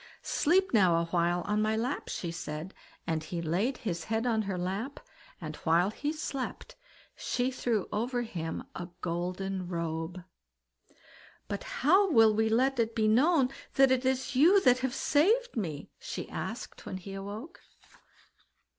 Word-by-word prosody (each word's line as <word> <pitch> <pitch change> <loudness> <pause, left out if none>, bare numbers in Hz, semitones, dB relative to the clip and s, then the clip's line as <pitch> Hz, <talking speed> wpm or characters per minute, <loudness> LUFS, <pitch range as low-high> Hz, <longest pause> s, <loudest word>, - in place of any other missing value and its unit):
"Sleep 365 +3 +2
now 185 -6 +5
a 170 0 +1
while 175 +1 +1
on 210 +4 0
my 215 0 +1
lap", 250 +5 -2
she 170 - -3
said; 165 +1 -6 0.3
and 160 -2 -1
he 170 +2 -4
laid 185 - 0
his 175 -10 -4
head 225 +2 -1
on 225 -3 +2
her 195 -3 -3
lap, 195 +10 -3 0.4
and - - -6
while 175 +4 +2
he 290 +7 -2
slept, 305 -4 -5 0.4
she 250 +1 -1
threw 235 -5 -1
over 240 +3 -1
him 165 -7 -4
a 175 - -6
golden 180 +2 -3
robe. 170 +1 -3 1.2
"But 200 - -4 0.2
how 380 +7 +6
shall 225 -7 +6
we 220 +1 +2
let 255 +3 +2
it 230 0 0
be 220 -2 +2
known 265 +4 +4 0.3
that 270 -1 +6
it 260 0 +2
is 260 0 0
you 340 +10 +7
that 250 -4 +5
have 260 0 -2
saved 435 +12 +2
me?" 165 - -4
she - - -5
asked, - - -6
when 185 - -4
he 195 +1 -9
awoke. 205 - -7
220 Hz, 155 wpm, -30 LUFS, 175-260 Hz, 1.2 s, you